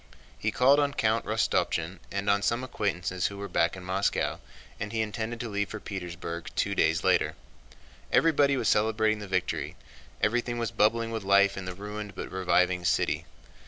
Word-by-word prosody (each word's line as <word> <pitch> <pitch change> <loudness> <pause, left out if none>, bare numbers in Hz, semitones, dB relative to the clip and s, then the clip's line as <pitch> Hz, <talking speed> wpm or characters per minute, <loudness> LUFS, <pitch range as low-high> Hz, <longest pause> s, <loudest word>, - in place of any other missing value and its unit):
He 110 - 0
called 130 +6 +4
on 145 -1 +1
Count 110 +1 +1
Rostopchín 95 -5 0
and 100 +1 -3
on 100 0 +3
some 115 +5 0
acquaintances 95 -7 -1
who 100 - -7
were 100 0 -5
back 85 -2 +1
in 95 - -9
Moscow, 95 +2 0 0.4
and 105 - -4
he 115 - -2
intended 110 +2 -3
to 120 - -3
leave 100 -2 -2
for 110 - -6
Petersburg 85 -4 -6
two - - 0
days - - +2
later. - - +2 0.8
Everybody 140 -4 +4
was 115 - 0
celebrating 110 0 +2
the 105 - -7
victory, 95 - -1 0.4
everything 120 +2 0
was 115 -2 -2
bubbling 115 +2 +2
with 110 -1 -3
life 100 0 +4
in 95 - -6
the 90 0 -5
ruined 105 +1 -7
but - - -6
reviving 90 -1 +2
city. 85 - +1
105 Hz, 175 wpm, -28 LUFS, 95-115 Hz, 0.8 s, called